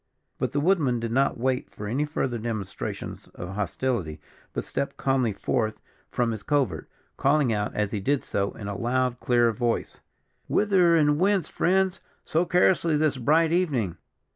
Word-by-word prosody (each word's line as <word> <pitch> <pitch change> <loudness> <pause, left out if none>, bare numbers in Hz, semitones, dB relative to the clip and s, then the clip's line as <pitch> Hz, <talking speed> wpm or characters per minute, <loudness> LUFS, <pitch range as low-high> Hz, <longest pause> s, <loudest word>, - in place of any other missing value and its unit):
But - - -1
the 145 - 0
woodman 145 -7 +2
did 115 0 -3
not 135 +3 +2
wait 130 +1 -1
for 105 - -8
any 130 +8 0
further 130 -5 -2
demonstrations 110 -4 -5
of 90 - -6
hostility, 100 -3 -2 0.3
but - - -3
stepped 140 - -3
calmly 130 -4 +1
forth 110 +2 -1 0.3
from 120 -1 0
his 110 -2 -5
covert, 145 -3 0 0.3
calling 140 -3 +3
out, 105 -1 -2
as 105 -1 0
he 105 - -2
did 140 +7 0
so, 100 0 -1
in 100 - -8
a 100 - -3
loud, 125 +2 0
clear 120 -1 +3
voice: 115 +1 -2 0.5
"Whither, 185 -5 +4
and 150 -2 +3
whence, 195 -2 +2
friends, 190 +1 +1 0.3
so 165 +3 +1
carelessly 170 -2 +3
this 150 -2 +1
bright 155 +6 +3
evening?" 140 - 0
130 Hz, 165 wpm, -26 LUFS, 110-155 Hz, 0.5 s, Whither